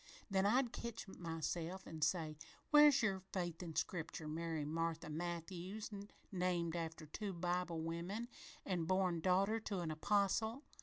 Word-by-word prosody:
Then 195 0 +4
I'd 245 +2 +3
ketch 230 -2 -5
myself 170 +1 -3
an' 160 -1 -7
say, 155 -1 +1 0.4
'Where's 295 -3 +8
your 195 -3 +2
faith 175 -3 -2
in 165 -3 -6
Scripture, 160 -2 -2
Mary 160 -1 -2
Marthy 165 +1 -1
Matthews, 175 +6 -4 0.4
named 175 -3 +1
after 165 -1 -3
two 195 +6 -4
Bible 175 -1 -1
women 175 +8 -3 0.4
an' 175 -4 0
born 185 -1 +2
daughter 195 +5 +3
to 205 -4 -2
an 165 -2 -2
apostle? 205 - +2
175 Hz, 140 wpm, -39 LUFS, 165-200 Hz, 0.4 s, Where's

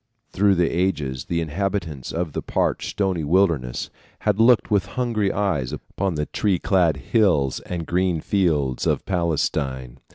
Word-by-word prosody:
Through 100 0 +3
the 85 -1 +2
ages 75 -8 -1
the 85 -1 -1
inhabitants 80 -4 -3
of 80 -3 -3
the - - -2
parched, - - -1
stony 95 -5 -1
wilderness 80 -7 +1 0.3
had 105 -1 +1
looked 115 0 +4
with 100 -2 +2
hungry 115 -5 +1
eyes 90 -11 -1
upon 95 -3 -3
the 75 0 -1
tree 100 +2 0
clad 85 -4 +2
hills 75 - +2
and 85 -2 -4
green 90 -1 +1
fields 75 -9 0
of - - 0
Palestine. 70 -8 -1
85 Hz, 150 wpm, -23 LUFS, 75-100 Hz, 0.3 s, looked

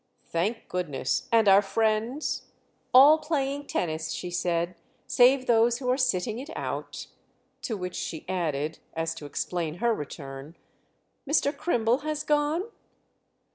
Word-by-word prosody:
"Thank 205 +8 -2
goodness! 140 -7 -2
And 225 -2 +4
our 195 +1 +7
friends?" 220 +7 -1 0.4
"All 285 +5 +8
playing 285 -2 -2
tennis," 155 -2 -2
she 175 +3 -4
said—"save 180 +10 +1
those 235 0 +4
who 250 -1 -1
are - - +3
sitting 225 -3 0
it 280 +4 -8
out." - - -5 0.6
To 220 - -3
which 180 -1 -5
she 160 - -5
added, 155 -4 -2 0.2
as 165 0 -1
to 155 -3 -9
explain 165 +1 -3
her 235 +5 +1
return: 140 -2 -8 0.7
"Mr. 290 -1 +2
Crimble 245 -6 +1
has 305 0 -3
gone?" 300 +4 +1
220 Hz, 130 wpm, -27 LUFS, 165-265 Hz, 0.7 s, All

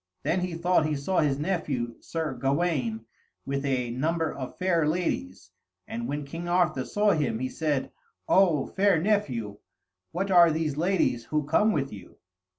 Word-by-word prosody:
Then 180 - +1
he 180 -2 -3
thought 170 -2 +2
he 155 - -1
saw 145 +7 0
his 145 -3 +2
nephew, 145 -8 -2
Sir 160 -4 -3
Gawaine, 135 -4 -1 0.4
with 140 0 -2
a 130 -4 -1
number 160 +5 -1
of 130 -2 -7
fair 170 -4 +2
ladies, 100 - -2 0.4
and 120 +1 -4
when 145 +1 -3
King 165 +5 -6
Arthur 175 -7 +1
saw 205 - +2
him, 145 - 0
he 130 +2 -3
said, 150 -3 -1 0.4
"O 170 -8 +4
fair 195 -3 +2
nephew, 130 - -1 0.5
what 195 +3 -2
are 175 -2 +7
these 155 -2 -1
ladies 160 -8 +1
who 150 -1 -1
come 165 +9 +3
with 140 - -2
you?" 95 -4 -12
150 Hz, 160 wpm, -27 LUFS, 130-175 Hz, 0.5 s, are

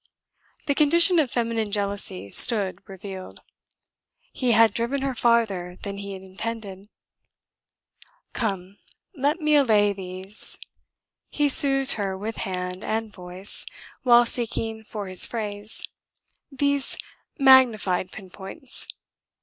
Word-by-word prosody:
The 285 - +1
condition 335 +4 +5
of 290 -5 +1
feminine 230 -3 -2
jealousy 200 - -2
stood 205 - +5
revealed. 190 -1 -9 0.9
He 250 -3 0
had 225 0 +5
driven 255 +4 -2
her 270 -1 -1
farther 215 -7 0
than 200 -1 -5
he 200 -1 -7
intended. 195 +1 -7 1.4
"Come, 195 -3 -4 0.4
let 290 +4 0
me 305 -1 +1
allay 215 -8 +3
these.. 190 +1 -1 0.4
." - - -65 0.2
he 295 -1 0
soothed 270 -1 +2
her 190 -1 -3
with 215 +3 -6
hand 180 0 -5
and 220 -1 -3
voice, 180 +2 -2 0.4
while 240 -1 +5
seeking 225 -2 -2
for 210 -1 -7
his 185 -1 +3
phrase; 210 -2 -4 0.6
"these 280 0 0 0.4
magnified 235 - +4
pinpoints. 195 - -8
215 Hz, 110 wpm, -24 LUFS, 190-255 Hz, 1.4 s, condition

